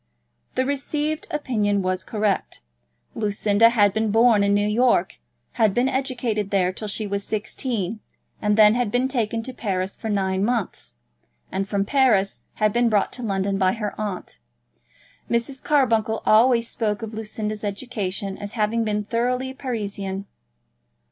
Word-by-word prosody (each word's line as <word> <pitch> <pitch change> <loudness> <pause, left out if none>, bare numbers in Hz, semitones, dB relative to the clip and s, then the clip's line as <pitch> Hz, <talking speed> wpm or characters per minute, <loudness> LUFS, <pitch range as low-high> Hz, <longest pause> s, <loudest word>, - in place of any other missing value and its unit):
The 260 - +1
received 295 +2 -2
opinion 210 -9 0
was 185 0 -1
correct. 210 - -1 0.5
Lucinda 210 +1 +3
had 205 -4 +3
been 220 0 0
born 225 -1 +5
in 200 0 +3
New 205 0 +2
York, 240 +3 +2 0.4
had 215 -3 +4
been 245 +2 +3
educated 245 -6 -1
there 185 -2 +1
till 215 - -6
she 210 +1 -1
was 200 0 -2
sixteen, 215 -1 -3 0.4
had 210 0 +2
then 220 +2 +5
been 245 +4 +1
taken 230 -3 -1
to 260 - -6
Paris 190 -5 -2
for 220 - -6
nine 190 -2 0
months, 225 - -2 0.6
and 195 +1 -2
from 200 -1 0
Paris 225 -6 +2
had 215 -1 +1
been 240 0 +3
brought 210 -2 +2
to 250 - -5
London 195 -3 -1
by 185 -1 +3
her 210 -3 -3
aunt. 205 -4 -5 0.9
Mrs. 235 +3 -1
Carbuncle 225 -6 +2
always 230 +1 +5
spoke 215 -2 -2
of 225 0 -6
Lucinda's 215 -1 -4
education 200 -2 -3
as 205 0 -6
having 225 +1 +1
been 210 -1 -1
thoroughly 250 +4 -1
Parisian. 200 -7 -4
215 Hz, 150 wpm, -23 LUFS, 200-240 Hz, 0.9 s, born